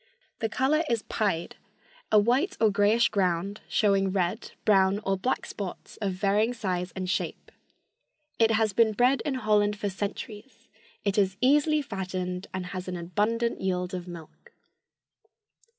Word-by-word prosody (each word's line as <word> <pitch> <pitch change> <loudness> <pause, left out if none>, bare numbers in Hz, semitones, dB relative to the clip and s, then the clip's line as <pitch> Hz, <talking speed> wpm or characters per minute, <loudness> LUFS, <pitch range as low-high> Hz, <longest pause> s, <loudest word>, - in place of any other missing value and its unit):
The 225 - -1
color 270 +7 +2
is 230 -2 0
pied, 195 -6 -2 0.5
a 215 - +6
white 255 - +2
or 220 -2 +4
grayish 205 +4 +3
ground 195 0 -1
showing 195 -2 +2
red, 190 +4 -2
brown 195 -2 +4
or 195 - +2
black 220 +7 -1
spots 195 -3 -7
of 200 -3 -2
varying 210 +5 +1
size 180 -5 -2
and 185 -1 -3
shape. 180 - -3 0.9
"It 225 -1 +5
has 220 -2 +2
been 220 +1 +4
bred 250 +5 +3
in 280 - -2
Holland 210 -3 +2
for 205 0 -2
centuries. 210 +4 -6 0.4
It 200 0 +2
is 190 -1 +1
easily 295 +3 +3
fattened 185 -5 -4
and 185 -1 -4
has 185 0 -6
an 180 -1 -3
abundant 210 +7 -1
yield 180 -1 -1
of 180 -1 -5
milk." 175 - -12
205 Hz, 150 wpm, -27 LUFS, 185-230 Hz, 0.9 s, a